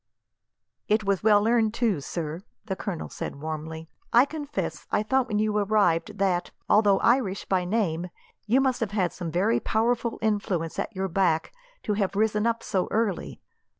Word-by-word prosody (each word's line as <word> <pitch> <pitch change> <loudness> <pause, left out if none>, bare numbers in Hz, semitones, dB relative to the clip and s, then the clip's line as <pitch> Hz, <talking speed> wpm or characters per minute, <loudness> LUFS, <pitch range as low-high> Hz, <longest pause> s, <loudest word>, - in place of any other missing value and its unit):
"It 215 +1 +2
was 195 -2 0
well 210 0 +4
earned, 225 -2 +2
too, 220 - +1
sir," 160 +2 -4 0.2
the 190 - -3
colonel 190 -4 -4
said - - -6
warmly. 160 +1 -5 0.2
"I 240 +3 +6
confess, 290 0 -5
I 210 - +2
thought 260 +3 +1
when 210 - -1
you 215 0 +1
arrived 200 -5 +2
that, 180 -3 +1 0.2
although 205 -2 +5
Irish 230 -5 +2
by 185 -2 0
name, 180 -4 -1 0.4
you 250 +5 +4
must 260 -2 +1
have 210 -3 -2
had 185 -5 0
some 175 -2 -5
very 190 +7 +2
powerful 235 +1 0
influence 200 -6 -1
at 225 - -3
your 190 0 -1
back 170 -3 +1 0.3
to 210 - 0
have 200 -2 -1
risen 215 +2 +2
so 190 -3 -1
early. 215 -4 -1
205 Hz, 165 wpm, -26 LUFS, 180-220 Hz, 0.4 s, I